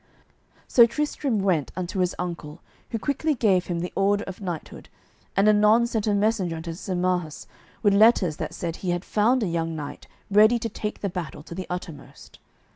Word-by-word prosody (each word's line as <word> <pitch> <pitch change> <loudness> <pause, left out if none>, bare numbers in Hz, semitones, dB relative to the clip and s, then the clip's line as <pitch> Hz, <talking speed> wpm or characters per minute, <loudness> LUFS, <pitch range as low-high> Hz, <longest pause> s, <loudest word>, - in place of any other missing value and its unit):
So 235 -2 +7
Tristram 275 -4 -1
went 170 -7 +1
unto 185 +2 -4
his 180 -1 +1
uncle, 170 -3 -6 0.3
who 230 - -2
quickly 285 +7 -1
gave 195 -7 +2
him 170 -1 -2
the 180 - -5
order 200 +2 +2
of 190 +1 -8
knighthood, 175 -5 -6 0.5
and 200 +2 +4
anon 215 +2 +5
sent 225 -2 -2
a 205 - +2
messenger 200 -5 +1
unto 165 +1 -6
Sir 185 +2 -5
Marhaus 180 -3 -1 0.4
with 205 -2 +4
letters 200 -6 +4
that - - -5
said 170 -1 -4
he 185 - -4
had 175 +1 -1
found 230 +4 +2
a - - 0
young 165 -1 -2
knight 150 -2 -7 0.2
ready 215 +4 +6
to 230 0 -3
take 210 0 -5
the 200 - -1
battle 170 -5 -6
to 170 - -10
the 185 +1 -6
uttermost. 175 -4 -8
190 Hz, 190 wpm, -25 LUFS, 175-215 Hz, 0.5 s, So